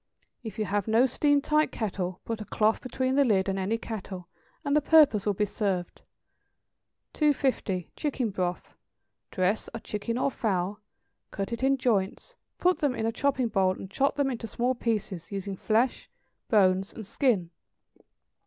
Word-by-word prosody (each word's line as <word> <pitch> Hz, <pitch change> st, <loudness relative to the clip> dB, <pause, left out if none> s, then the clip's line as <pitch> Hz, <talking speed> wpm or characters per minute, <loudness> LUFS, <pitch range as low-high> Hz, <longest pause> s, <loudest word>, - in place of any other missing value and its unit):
If 220 Hz, -3 st, -7 dB
you 215 Hz, -, 0 dB
have 205 Hz, +1 st, -1 dB
no 225 Hz, +3 st, +5 dB
steam 290 Hz, +2 st, +2 dB
tight 305 Hz, +1 st, +2 dB
kettle, 185 Hz, -4 st, -3 dB
put 225 Hz, -1 st, -3 dB
a -, -, -5 dB
cloth 215 Hz, +1 st, +1 dB
between 260 Hz, +1 st, -1 dB
the 280 Hz, +1 st, +5 dB
lid 200 Hz, -7 st, +2 dB
and 195 Hz, 0 st, -1 dB
any 200 Hz, +4 st, 0 dB
kettle, 195 Hz, -6 st, -7 dB, 0.4 s
and 285 Hz, 0 st, +1 dB
the 300 Hz, -, +4 dB
purpose 290 Hz, -10 st, +5 dB
will 205 Hz, -, +2 dB
be 210 Hz, -, +1 dB
served. 190 Hz, -4 st, -2 dB, 1.1 s
250. 260 Hz, -, 0 dB
=Chicken 260 Hz, -7 st, -1 dB
Broth.= 180 Hz, -2 st, -3 dB, 0.6 s
Dress 185 Hz, +2 st, 0 dB
a -, -, -4 dB
chicken 225 Hz, +2 st, -3 dB
or 275 Hz, -, +1 dB
fowl, 200 Hz, -3 st, -1 dB, 0.5 s
cut 200 Hz, +3 st, -4 dB
it 235 Hz, -, -4 dB
in 270 Hz, +1 st, +3 dB
joints, 210 Hz, -7 st, -1 dB, 0.2 s
put 360 Hz, 0 st, +2 dB
them 285 Hz, -4 st, +1 dB
in 220 Hz, -, -2 dB
a 225 Hz, -, +1 dB
chopping 255 Hz, 0 st, 0 dB
bowl, 190 Hz, -3 st, +2 dB
and 190 Hz, 0 st, -9 dB
chop 275 Hz, +7 st, +1 dB
them 280 Hz, -2 st, +1 dB
into 230 Hz, -2 st, -5 dB
small 245 Hz, +4 st, 0 dB
pieces, 210 Hz, -8 st, -3 dB
using 195 Hz, 0 st, -4 dB
flesh, 225 Hz, +6 st, 0 dB, 0.4 s
bones, 190 Hz, -3 st, +3 dB
and 220 Hz, -, -8 dB
skin. 205 Hz, -, +1 dB
220 Hz, 165 wpm, -28 LUFS, 195-260 Hz, 1.1 s, no